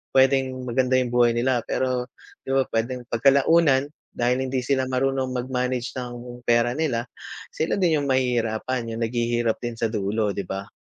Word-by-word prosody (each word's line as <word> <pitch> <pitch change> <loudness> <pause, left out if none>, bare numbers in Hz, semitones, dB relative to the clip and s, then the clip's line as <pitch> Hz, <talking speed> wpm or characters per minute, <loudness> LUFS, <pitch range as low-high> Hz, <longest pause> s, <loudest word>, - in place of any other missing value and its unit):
puwedeng 135 0 +4 0.2
maganda 130 +1 +2
'yong 125 -2 -1
buhay 120 -1 +4
nila, 125 0 +1
pero, 125 -1 -1 0.3
'di - - -5
ba, 135 - +4
puwedeng 120 +2 -2
pagkalaunan 140 +3 +4 0.2
dahil 125 +1 +1
hindi 130 0 -1
sila 130 -1 +1
marunong 135 0 0
mag-manage 125 0 -2
ng 120 -1 -7
pera 120 0 +3
nila, 135 -7 -1 0.5
sila 160 - -1
din 175 -4 +3
'yong 140 - -2
mahihirapan, 120 -2 0
'yong 115 - -5
naghihirap 120 -1 0
din 120 -1 -4
sa 115 - +1
dulo, 105 0 0
'di 100 - -2
ba? 95 0 -5
125 Hz, 160 wpm, -24 LUFS, 120-130 Hz, 0.5 s, puwedeng